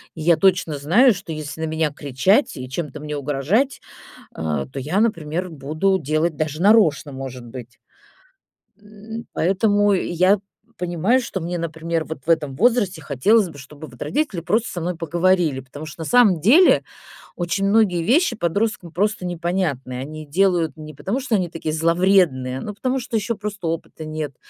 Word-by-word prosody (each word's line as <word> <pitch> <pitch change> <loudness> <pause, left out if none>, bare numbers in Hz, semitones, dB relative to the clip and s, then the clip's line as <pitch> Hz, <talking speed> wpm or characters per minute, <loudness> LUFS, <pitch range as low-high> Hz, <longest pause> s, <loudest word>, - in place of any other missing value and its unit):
И 160 - -7
я 170 +1 +4
точно 180 -6 +2
знаю, 210 - +4
что 180 -3 -8
если 155 +1 -6
на - - 0
меня 160 -1 0
кричать 145 - +1
и 130 0 -6
чем-то 150 +1 -5
мне 150 0 -5
угрожать, 150 - 0 0.5
а, 75 -4 -3
то 65 - -8
я, 155 +10 -1
например, 175 -5 -1
буду 155 +6 0
делать 155 +1 -1
даже 155 +2 -3
нарочно, 170 -9 +4
может 130 -2 -7
быть. 120 -1 -10 1.0
М, 215 +2 -10
поэтому 205 +3 +2
я 185 +2 +2 0.4
понимаю, 180 +8 +1
что 195 -7 -4
мне, 175 +1 -3
например, 165 0 -3
вот 160 -3 -7
в 170 - -7
этом 150 -5 +1
возрасте 205 - +2
хотелось 185 - +2
бы, 145 - -12
чтобы 145 +3 -11
вот - - -16
родители 285 - -1
просто 220 +7 0
со 175 - -5
мной 175 +1 -2
поговорили, 170 -3 +1
потому 145 +4 -10
что 155 +2 -9
на - - -4
самом 220 -8 +4
деле 280 - +5 0.5
очень 175 +3 -1
многие 200 -5 +3
вещи 255 - +3
подросткам 185 -1 -1
просто 205 +2 -1
непонятны. 170 -7 -2
Они 155 +3 -7
делают 170 -2 +1
не 155 0 -9
потому, 200 - -3
что 250 -5 0
они 180 -3 -1
такие 160 -1 -4
зловредные, 165 -6 +2
но 210 - -6
потому, 255 +5 -1
что 235 -2 -3
ещё 220 +1 -1
просто 200 -4 -5
опыта 160 -1 -5
нет. 155 -3 -5
170 Hz, 170 wpm, -21 LUFS, 150-200 Hz, 1.0 s, деле